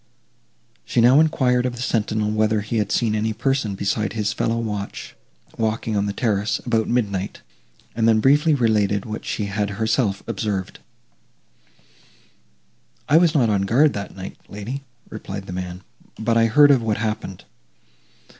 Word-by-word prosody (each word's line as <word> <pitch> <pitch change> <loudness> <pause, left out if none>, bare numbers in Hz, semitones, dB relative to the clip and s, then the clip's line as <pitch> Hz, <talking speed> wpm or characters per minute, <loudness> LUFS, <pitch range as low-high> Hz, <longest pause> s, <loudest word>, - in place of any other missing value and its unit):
She - - -1
now 125 +5 +6
enquired 130 -6 +2
of 125 - -4
the 120 - -7
sentinel, 110 -3 0
whether 110 0 +1
he 105 +3 -3
had 105 -2 -1
seen 115 -3 +1
any 110 +1 0
person 120 -3 -1
besides 100 +3 -2
his 105 -2 -1
fellow 115 +1 -1
watch, 105 -3 -5 0.4
walking 110 0 -1
on 100 0 0
the - - -1
terrace, 105 -1 0
about 115 -3 +1
midnight; 100 -5 -2 0.5
and 115 0 +2
then 110 -1 +4
briefly 145 +6 +4
related 105 -5 +1
what 110 0 -6
she 105 - -2
had 100 0 -2
herself 110 -2 0
observed. 100 -4 -3 2.3
"I 150 - +5
was 170 -1 +3
not 120 -7 +3
on 100 -2 +1
guard 130 +10 +3
that 100 -1 -6
night, 95 0 -8
lady," 110 +7 -6 0.3
replied 100 -2 -7
the 90 - -7
man, 90 0 -6 0.4
"but 115 +1 0
I 115 0 +4
heard 145 +5 +6
of 135 -4 +4
what 110 -2 -1
happened. 105 -4 -4
110 Hz, 155 wpm, -22 LUFS, 100-120 Hz, 2.3 s, now